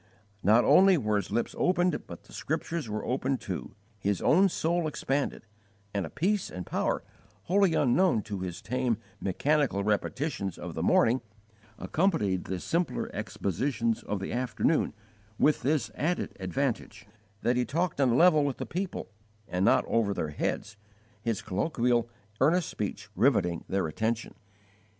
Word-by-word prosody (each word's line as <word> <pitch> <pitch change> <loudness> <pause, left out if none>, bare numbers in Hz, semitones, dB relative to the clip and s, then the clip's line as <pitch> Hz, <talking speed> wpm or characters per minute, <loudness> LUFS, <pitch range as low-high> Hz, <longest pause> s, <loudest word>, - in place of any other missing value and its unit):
Not 110 +5 +5
only 185 +6 +6
were 105 -6 +1
his 100 -2 -3
lips 120 - -1
opened, 180 0 +1
but - - -9
the - - -17
Scriptures 165 -8 -3
were 105 0 -3
opened 130 +1 0
too, 95 0 -6 0.2
his 100 -1 0
own 190 +4 +4
soul 170 -1 0
expanded, 140 -4 -2 0.5
and 100 -5 -1
a - - -10
peace 190 +7 0
and 90 -1 -6
power, - - -1 0.4
wholly 190 - +3
unknown 140 - +3
to 105 -3 -5
his 90 -1 -5
tame, 125 -3 0 0.2
mechanical 135 +1 +1
repetitions 105 - -1
of - - -6
the - - -3
morning, 120 +3 +4 0.6
accompanied 110 - 0
the 95 -1 -3
simpler 170 - -1
expositions 115 - -1
of 105 - -3
the 95 - -4
afternoon, 125 +1 +1 0.4
with 150 - +3
this 140 -1 0
added 175 +4 -1
advantage, 105 +1 -2 0.4
that 120 - +2
he 125 - +2
talked 160 +3 -1
on 135 - +4
a 120 - +3
level 160 -1 +6
with 140 -2 -1
the - - -4
people 185 +1 -4 0.4
and 90 +1 -1
not - - +4
over 105 -3 +1
their 80 - -2
heads, 105 +7 -3 0.4
his 115 -2 -2
colloquial, 120 - +1 0.3
earnest 165 +6 +3
speech 105 -2 -4
riveting 85 -1 +2
their 95 -1 +1
attention. 110 +8 -2
125 Hz, 150 wpm, -29 LUFS, 100-155 Hz, 0.6 s, only